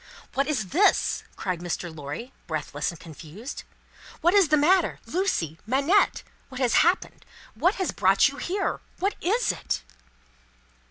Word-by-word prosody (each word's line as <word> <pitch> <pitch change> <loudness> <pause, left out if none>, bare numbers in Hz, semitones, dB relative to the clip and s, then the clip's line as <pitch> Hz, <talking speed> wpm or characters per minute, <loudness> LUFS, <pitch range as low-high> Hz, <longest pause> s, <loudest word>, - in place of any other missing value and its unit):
"What 275 +1 +1
is 250 -11 -1
this?" 385 +7 +3
cried 185 -3 -3
Mr. 175 -1 -4
Lorry, 150 - -7
breathless 150 -2 -2
and 170 - -8
confused. 170 - -9 0.6
"What 345 +2 +4
is 400 -4 +6
the 305 +1 +4
matter? 360 +6 +3
Lucie! 175 - -1
Manette! 280 - +2 0.3
What 260 -1 -8
has 250 -3 +3
happened? 350 +3 +1 0.3
What 360 +4 +2
has 375 - -1
brought - - +4
you - - -5
here? 390 +3 -2 0.2
What 395 +3 0
is 435 +6 +2
it?" 60 - -3
270 Hz, 145 wpm, -26 LUFS, -, 0.6 s, is